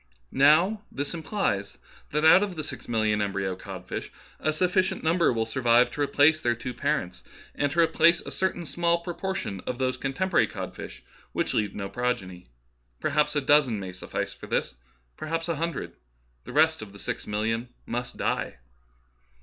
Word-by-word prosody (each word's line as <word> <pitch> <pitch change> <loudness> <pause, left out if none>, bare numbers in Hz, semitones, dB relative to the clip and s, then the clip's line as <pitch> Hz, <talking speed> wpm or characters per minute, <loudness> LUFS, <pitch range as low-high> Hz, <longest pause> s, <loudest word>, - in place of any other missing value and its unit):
Now 165 +10 +5
this 145 +3 -3
implies 160 - -2 0.3
that 150 +1 0
out 165 +4 +8
of 200 -3 -2
the 155 - -4
six - - -8
million 110 -2 +1
em 100 -1 -1
bryo 95 -1 -1
codfish 95 -1 -7 0.3
a 155 - +1
sufficient 185 +4 +1
number 170 +2 +3
will 115 -2 0
survive 120 +1 +3
to 145 - -4
replace 145 +2 +4
their 120 -1 +1
two 125 +2 -5
parents, 90 -6 -2 0.3
and 145 -1 0
to 170 +3 +3
replace 165 +1 +4
a - - -8
certain 190 -2 -1
small 170 +1 +1
proportion 175 - -3
of 125 - -2
those 130 0 0
contemporary 170 +8 +1
codfishes 60 +1 -7 0.3
who - - +1
leave 105 -1 0
no 100 -1 -3
progeny. 100 - -3 0.5
Perhaps 150 0 +1
a 145 - +2
dozen 135 -6 +4
may 95 -2 -5
suffice 90 - -4
for - - -11
this, - - -1 0.4
perhaps 165 +2 -3
a 165 -3 -1
hundred. 165 +2 -3 0.5
The - - -8
rest 160 0 +4
of 105 -2 -9
the - - -11
six - - -4
million 115 +3 -1 0.2
must 125 +1 -4
die." - - -1
140 Hz, 170 wpm, -27 LUFS, 110-165 Hz, 0.5 s, out